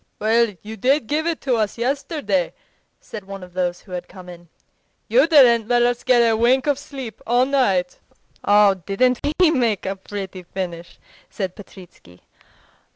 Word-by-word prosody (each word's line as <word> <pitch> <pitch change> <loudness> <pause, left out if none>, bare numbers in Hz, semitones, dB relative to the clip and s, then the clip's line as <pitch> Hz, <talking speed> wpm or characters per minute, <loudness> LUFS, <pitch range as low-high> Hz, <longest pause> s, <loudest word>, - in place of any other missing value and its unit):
"Well, 220 0 +1
you 220 +1 -8
did 265 +5 +1
give 305 +7 -1
it 335 -2 -2
to 255 -4 0
us 215 0 -1
yesterday," 245 - -2 0.4
said 215 -3 -9
one 195 -1 -8
of 180 -1 -13
those 175 -1 -2
who 190 - -18
had 180 -1 -5
come 185 -2 -13
in; 175 -1 -13 0.6
"you - - +4
didn't 245 -8 +5
let 240 0 +3
us 240 0 0
get 250 -2 +4
a 225 - +2
wink 245 +4 +2
of 290 -2 0
sleep 260 -7 -9
all 245 +2 +3
night." 200 -10 0 0.4
"Oh, 205 -1 +5
didn't 200 +7 0 0.2
we 355 -3 +5
make 235 - 0
a 195 +1 -2
pretty 190 -1 -7
finish!" 175 -1 -7 0.3
said 190 -3 -5
Petritsky. 180 - -15
220 Hz, 165 wpm, -21 LUFS, 190-255 Hz, 0.6 s, didn't